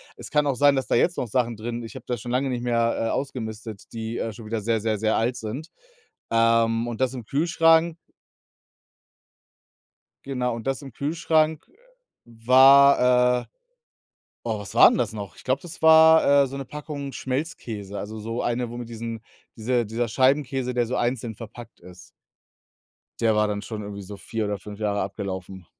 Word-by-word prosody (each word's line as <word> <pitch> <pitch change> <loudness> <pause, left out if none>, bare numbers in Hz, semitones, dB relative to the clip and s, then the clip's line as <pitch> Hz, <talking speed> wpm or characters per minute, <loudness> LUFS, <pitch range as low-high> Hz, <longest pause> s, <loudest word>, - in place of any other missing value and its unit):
Es - - -10
kann 150 0 +2
auch 140 -2 0
sein, 145 +2 +4
dass 135 - -1
da - - -2
jetzt 175 +8 +2
noch 125 - -2
Sachen 120 +1 0
drin 120 +2 -5
ich 115 - -10
habe 130 -2 -10
da 125 - -2
schon 120 +2 -8
lange 130 +2 0
nicht 125 -2 -3
mehr, 115 -1 +1
äh, - - -1
ausgemistet 110 -5 -5
die, 115 0 -4
äh, 115 - -3
schon 110 +1 -11
wieder 110 0 -3
sehr, 115 +1 0
sehr, 110 -1 -1
sehr 110 +1 +1
alt 120 +2 0
sind. 125 +10 -6 0.6
Ähm, 115 0 +2
und 120 -2 -5
das 130 -1 +1
im 125 -4 -7
Kühlschrank 165 +3 +3 2.3
Genau, 125 -3 -2
und 115 +1 -7
das 135 +1 -1
im 135 -3 -10
Kühlschrank 155 +2 0 0.6
war 125 +1 +5
äh, - - -17 1.0
oh, 110 -3 -2
was 100 - -9
war - - +8
'n - - 0
das - - -1
noch? 100 -4 -7
Ich - - -14
glaube, 130 +2 0
das 170 -2 -11
war, 160 -3 +7
äh, - - -2
so 135 +1 -7
'ne 135 - -5
Packung 145 0 -7
Schmelzkäse, 120 -9 -5
also 110 +1 -6
so 115 +3 -4
eine, 120 0 -2
wo 120 - -7
mit 120 -1 -7
diesen 115 -1 -6 0.4
diese 120 +1 0
dieser 115 +3 -2
Scheibenkäse, 130 +1 +1
der 120 -1 +1
so 125 - -3
einzeln 120 -2 -2
verpackt 115 +1 -11
ist. 90 0 -15 1.1
Der 115 -2 +2
war 105 0 +2
dann 105 -1 -3
schon 105 0 -6
irgendwie 100 0 -7
so 100 +1 -9
4 110 +2 -4
oder 105 0 -2
5 105 +1 -11
Jahre 105 -1 -1
abgelaufen. 95 -2 -6
120 Hz, 185 wpm, -24 LUFS, 110-135 Hz, 2.3 s, war